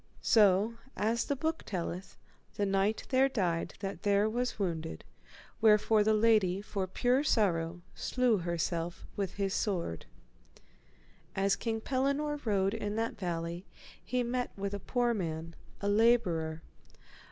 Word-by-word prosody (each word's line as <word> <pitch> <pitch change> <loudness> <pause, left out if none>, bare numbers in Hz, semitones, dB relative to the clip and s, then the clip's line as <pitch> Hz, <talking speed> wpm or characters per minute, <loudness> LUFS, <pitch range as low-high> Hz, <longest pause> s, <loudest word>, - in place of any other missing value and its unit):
So, 210 +1 +4 0.2
as 225 +2 +1
the 285 - -1
book 320 +4 -2
telleth, 180 0 -5 0.4
the 205 - 0
knight 195 +2 +1
there 265 +1 +4
died 180 -9 -1
that 195 0 -4
there 205 +1 +3
was 245 +3 -2
wounded, 165 -5 -3 0.6
wherefore 215 0 +5
the 215 +1 +3
lady 210 -4 +3
for 200 -2 -3
pure 250 +8 +2
sorrow 175 - +1
slew 250 -4 +1
herself 170 0 -2
with 195 -3 -3
his 195 -1 -1
sword. 170 - -2 1.3
As 195 +1 +2
King 225 +2 -3
Pellinore 280 +4 -1
rode 195 -2 +2
in 210 -2 -3
that 225 +1 -1
valley 170 -1 -3 0.4
he 245 +6 0
met 245 +1 -1
with 200 0 -3
a 200 - -3
poor 240 +3 0
man, 165 -5 -4 0.3
a 200 - -1
labourer. 185 -8 +2
205 Hz, 135 wpm, -31 LUFS, 180-230 Hz, 1.3 s, wherefore